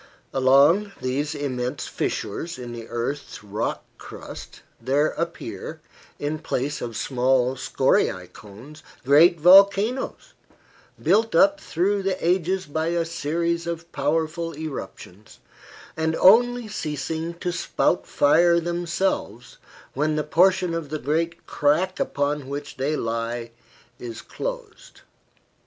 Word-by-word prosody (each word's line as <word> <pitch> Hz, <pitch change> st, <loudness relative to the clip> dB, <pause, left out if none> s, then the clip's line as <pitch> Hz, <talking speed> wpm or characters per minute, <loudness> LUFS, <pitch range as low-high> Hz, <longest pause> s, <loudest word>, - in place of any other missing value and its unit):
Along 140 Hz, +10 st, +4 dB
these 145 Hz, +4 st, -2 dB
immense 130 Hz, -2 st, -3 dB
fissures 170 Hz, 0 st, -3 dB
in 120 Hz, -2 st, -7 dB
the 115 Hz, -1 st, -8 dB
earth's 120 Hz, +2 st, -4 dB
rock 105 Hz, +2 st, -3 dB, 0.2 s
crust -, -, -10 dB, 0.2 s
there 140 Hz, +5 st, +2 dB
appear, 170 Hz, 0 st, -5 dB, 0.4 s
in 150 Hz, +2 st, -3 dB
place 145 Hz, 0 st, -3 dB
of 115 Hz, -2 st, -5 dB
small 130 Hz, 0 st, +1 dB
scoriae 90 Hz, -7 st, +1 dB
cones, 115 Hz, +9 st, -13 dB, 0.2 s
great 160 Hz, +5 st, +6 dB
volcanoes, 200 Hz, -, +4 dB, 0.7 s
built 225 Hz, +2 st, +2 dB
up 300 Hz, +1 st, +5 dB
through 195 Hz, +4 st, 0 dB
the 190 Hz, -1 st, -1 dB
ages 185 Hz, +1 st, +1 dB
by 160 Hz, +2 st, -2 dB
a 170 Hz, 0 st, 0 dB
series 170 Hz, +1 st, -2 dB
of 170 Hz, 0 st, -5 dB
powerful 160 Hz, +3 st, -1 dB
eruptions, 135 Hz, -, -8 dB, 0.6 s
and 160 Hz, 0 st, 0 dB
only 240 Hz, +5 st, +5 dB
ceasing 160 Hz, -2 st, -4 dB
to 175 Hz, +1 st, -3 dB
spout 175 Hz, 0 st, 0 dB
fire 170 Hz, +4 st, +4 dB
themselves 170 Hz, -, -2 dB, 0.3 s
when 150 Hz, +3 st, 0 dB
the 150 Hz, -, 0 dB
portion 180 Hz, +2 st, +3 dB
of 165 Hz, -3 st, -4 dB
the 155 Hz, -, -3 dB
great 165 Hz, +4 st, -2 dB
crack 175 Hz, +6 st, +1 dB
upon 145 Hz, -1 st, -1 dB
which 145 Hz, +1 st, -6 dB
they 140 Hz, +4 st, 0 dB
lie 115 Hz, -1 st, -3 dB, 0.5 s
is 115 Hz, -2 st, -7 dB
closed. -, -, -7 dB
155 Hz, 115 wpm, -24 LUFS, 135-175 Hz, 0.7 s, great